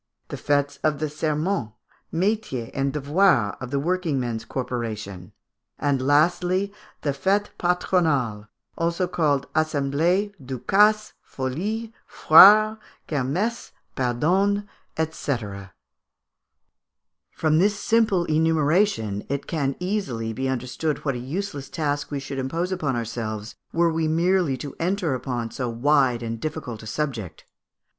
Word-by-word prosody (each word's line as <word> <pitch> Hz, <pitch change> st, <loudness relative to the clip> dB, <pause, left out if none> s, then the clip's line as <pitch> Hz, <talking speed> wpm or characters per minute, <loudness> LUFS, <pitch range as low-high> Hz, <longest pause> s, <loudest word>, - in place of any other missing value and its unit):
the -, -, -4 dB
fêtes 145 Hz, -1 st, 0 dB
of 155 Hz, -2 st, +2 dB
the 155 Hz, -, -1 dB
Serments, 150 Hz, -, -2 dB, 0.4 s
Métiers, 180 Hz, -, -1 dB
and 135 Hz, 0 st, 0 dB
Devoirs 145 Hz, -, +2 dB
of 130 Hz, -, -5 dB
the 140 Hz, -, -1 dB
working 170 Hz, -2 st, 0 dB
men's 115 Hz, -3 st, -3 dB
corporation; 110 Hz, -7 st, -5 dB, 0.5 s
and 140 Hz, -2 st, 0 dB
lastly, 175 Hz, +7 st, +2 dB, 0.3 s
the 145 Hz, -, +1 dB
Fêtes 200 Hz, +8 st, 0 dB
Patronales, 155 Hz, -, +1 dB, 0.6 s
called 145 Hz, -4 st, +1 dB
also 155 Hz, -1 st, +1 dB
Assemblées, 170 Hz, +9 st, +1 dB
Ducasses, 210 Hz, -, +2 dB
Folies, 200 Hz, -, -4 dB, 0.2 s
Foires, 215 Hz, +6 st, +7 dB, 0.3 s
Kermesses, 165 Hz, -, -2 dB, 0.2 s
Pardons, 175 Hz, +11 st, +1 dB, 0.5 s
&c. 145 Hz, -3 st, -2 dB, 1.9 s
From 155 Hz, 0 st, +1 dB
this 205 Hz, +2 st, +2 dB
simple 215 Hz, -7 st, +2 dB
enumeration, 155 Hz, -, +1 dB
it 140 Hz, +1 st, -2 dB
can 140 Hz, -4 st, -1 dB
easily 180 Hz, -, -2 dB
be 130 Hz, +4 st, -2 dB
understood 130 Hz, +5 st, -2 dB
what 135 Hz, -, +1 dB
a 125 Hz, -, -4 dB
useless 145 Hz, +1 st, -5 dB
task 145 Hz, -2 st, -2 dB
we 145 Hz, -, -3 dB
should 140 Hz, 0 st, -5 dB
impose 165 Hz, +8 st, -2 dB
upon 155 Hz, -8 st, -1 dB
ourselves 110 Hz, -2 st, -4 dB, 0.2 s
were 170 Hz, -1 st, +2 dB
we 160 Hz, 0 st, 0 dB
merely 170 Hz, -2 st, +2 dB
to 140 Hz, +1 st, -7 dB
enter 175 Hz, -3 st, 0 dB
upon 125 Hz, -3 st, -3 dB
so 125 Hz, -2 st, -3 dB
wide 125 Hz, 0 st, +2 dB
and 115 Hz, 0 st, -4 dB
difficult 150 Hz, -7 st, -5 dB
a 110 Hz, -, -10 dB
subject. 115 Hz, -, -4 dB
150 Hz, 120 wpm, -24 LUFS, 130-180 Hz, 1.9 s, Foires